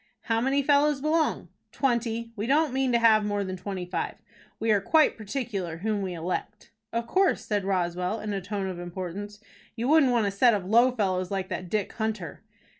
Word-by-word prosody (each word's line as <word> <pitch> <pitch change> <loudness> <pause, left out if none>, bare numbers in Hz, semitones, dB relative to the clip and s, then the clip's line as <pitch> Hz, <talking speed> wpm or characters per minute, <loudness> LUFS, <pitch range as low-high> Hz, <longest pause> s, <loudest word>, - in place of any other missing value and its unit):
"How 225 -1 0
many 275 +3 +1
fellows 290 0 +3
belong?" 310 +2 0 0.2
"Twenty. 235 -3 -1
We 215 +1 -3
don't 295 0 +2
mean 265 -1 +1
to 240 - +4
have 220 -2 +5
more 205 -1 -1
than 185 -1 -4
twenty 185 0 -5
five. 175 -2 -3 0.4
We 225 0 +1
are 205 -2 +3
quite 310 +8 +4
particular 205 -7 -4
whom 210 +3 -1
we 185 -2 -3
elect." 180 +5 -5 0.2
"Of 230 0 -2
course," 380 +10 +1
said 205 -2 -1
Roswell, 180 +2 -1
in 210 -1 -4
a 195 - -2
tone 200 +1 -3
of 185 -2 -5
importance. 185 +4 -6 0.4
"You 240 +1 -2
wouldn't 305 -4 +5
want 235 -3 +2
a 200 - 0
set 230 +3 +4
of 195 -3 -3
low 235 +6 +5
fellows 190 -7 -1
like 190 -1 -3
that 180 - -5
Dick 210 0 -1
Hunter." 215 -8 -4
210 Hz, 195 wpm, -27 LUFS, 190-245 Hz, 0.4 s, have